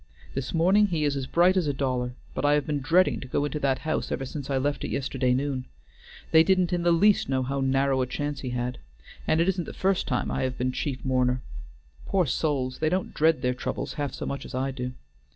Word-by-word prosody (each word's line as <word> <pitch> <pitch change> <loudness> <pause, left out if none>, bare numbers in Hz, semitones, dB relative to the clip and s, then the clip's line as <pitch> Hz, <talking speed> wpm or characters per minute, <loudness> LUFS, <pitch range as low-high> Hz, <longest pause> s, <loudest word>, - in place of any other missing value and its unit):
This 135 0 -3
morning 190 +6 +4
he 165 -5 -1
is 145 -1 +1
as 135 -2 -3
bright 175 +5 +4
as 180 -5 +1
a 145 - +1
dollar, 125 -2 -1 0.2
but - - -3
I 145 0 +4
have 150 -1 +2
been 150 -2 -1
dreading 170 +7 +3
to 130 - -8
go 145 +3 0
into 150 +1 -3
that 135 -2 +1
house 155 - -1
ever 135 - -2
since 140 +1 -6
I 135 - +1
left 140 +1 -1
it - - -2
yesterday 130 -2 0
noon. 135 -1 -2 0.7
They 160 - +8
didn't 185 0 +2
in 175 - +1
the 170 0 +3
least 200 +2 +4
know 130 -1 +1
how 135 +2 -2
narrow 135 0 +2
a 125 - 0
chance 145 +2 -3
he 130 - -4
had. 125 0 -3 0.5
And 155 - +3
it 170 - +3
isn't 185 -3 0
the - - -8
first 190 0 0
time 125 - -1
I - - -1
have 130 -1 -2
been 130 +1 0
chief 130 0 -4
mourner. 125 -1 +1 0.6
Poor 190 -3 +2
souls! 135 -3 -1
they 155 - +2
don't 185 +2 -1
dread 160 0 +2
their 125 0 +2
troubles 125 - -4
half 145 -3 -3
so - - -5
much 140 - -4
as - - -8
I 135 +1 -1
do. 125 -1 -5
140 Hz, 240 wpm, -26 LUFS, 130-165 Hz, 0.7 s, They